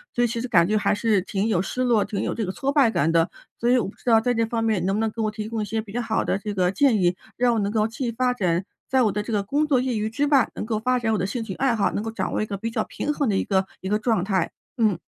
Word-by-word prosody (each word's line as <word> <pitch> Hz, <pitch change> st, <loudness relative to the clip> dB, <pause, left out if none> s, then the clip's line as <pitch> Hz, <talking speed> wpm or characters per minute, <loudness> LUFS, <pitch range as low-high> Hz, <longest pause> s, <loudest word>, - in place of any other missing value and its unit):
所 245 Hz, -, +2 dB
以 240 Hz, -, +3 dB
其 230 Hz, +1 st, -3 dB
实 250 Hz, -, -3 dB
感 175 Hz, -9 st, +4 dB
觉 215 Hz, -, +2 dB
还 210 Hz, -, +1 dB
是 205 Hz, -2 st, +2 dB
挺 200 Hz, +3 st, -2 dB
有 180 Hz, -5 st, +2 dB
失 255 Hz, +6 st, -2 dB
落 235 Hz, -4 st, +3 dB
挺 200 Hz, -, -3 dB
有 -, -, -1 dB
这 225 Hz, -, -2 dB
个 185 Hz, -, -4 dB
挫 275 Hz, 0 st, -1 dB
败 280 Hz, -5 st, +4 dB
感 160 Hz, -7 st, +1 dB
的， 165 Hz, 0 st, +3 dB, 0.3 s
所 235 Hz, -, +1 dB
以 250 Hz, -, +5 dB
我 235 Hz, -, 0 dB
不 -, -, -14 dB
知 -, -, -24 dB
道 225 Hz, -2 st, +5 dB
在 245 Hz, +1 st, +1 dB
这 230 Hz, -1 st, +1 dB
方 225 Hz, 0 st, -2 dB
面 220 Hz, -5 st, +1 dB
能 195 Hz, +1 st, +1 dB
不 215 Hz, -, 0 dB
能 220 Hz, -1 st, 0 dB
给 230 Hz, -, -11 dB
我 215 Hz, -, +1 dB
提 215 Hz, 0 st, -6 dB
供 225 Hz, -1 st, -2 dB
一 210 Hz, -, -2 dB
些 220 Hz, +1 st, -2 dB
比 215 Hz, -, -12 dB
较 240 Hz, +3 st, -2 dB
好 225 Hz, -1 st, 0 dB
的 -, -, 0 dB
这 205 Hz, 0 st, -4 dB
个 180 Hz, -1 st, +1 dB
建 270 Hz, +2 st, +3 dB
议， 175 Hz, 0 st, +2 dB, 0.2 s
让 245 Hz, -1 st, +2 dB
我 -, -, +1 dB
能 200 Hz, -, 0 dB
够 215 Hz, -1 st, +2 dB
继 235 Hz, +2 st, -3 dB
发 250 Hz, +1 st, +1 dB
展， 180 Hz, -6 st, 0 dB, 0.3 s
在 265 Hz, -1 st, +3 dB
我 215 Hz, -, +2 dB
的 210 Hz, +2 st, -2 dB
这 225 Hz, -, -5 dB
个 205 Hz, -1 st, +1 dB
工 290 Hz, +9 st, +1 dB
作 275 Hz, -4 st, +3 dB
业 255 Hz, -3 st, -1 dB
余 215 Hz, +1 st, -1 dB
之 280 Hz, +6 st, 0 dB
外， 275 Hz, -4 st, +4 dB
能 -, -, -4 dB
够 220 Hz, -2 st, -1 dB
发 250 Hz, +2 st, +1 dB
展 225 Hz, -2 st, 0 dB
我 -, -, +1 dB
的 185 Hz, -, -1 dB
兴 225 Hz, +4 st, -3 dB
趣 200 Hz, -4 st, -5 dB
爱 260 Hz, -3 st, +1 dB
好， 205 Hz, -, +1 dB
能 205 Hz, -, -3 dB
够 225 Hz, -, -4 dB
掌 225 Hz, -, -3 dB
握 -, -, 0 dB
一 -, -, 0 dB
个 205 Hz, -2 st, -5 dB
比 225 Hz, +4 st, -3 dB
较 230 Hz, -, -1 dB
平 295 Hz, -, -3 dB
衡 285 Hz, -3 st, 0 dB
的 200 Hz, -, +1 dB
一 -, -, +1 dB
个 190 Hz, -1 st, +1 dB, 0.2 s
一 190 Hz, -, -4 dB
个 210 Hz, +1 st, +1 dB
状 220 Hz, -5 st, +1 dB
态， 190 Hz, -3 st, 0 dB, 0.3 s
嗯。 215 Hz, -6 st, +2 dB
220 Hz, 370 characters per minute, -24 LUFS, 200-240 Hz, 0.3 s, 以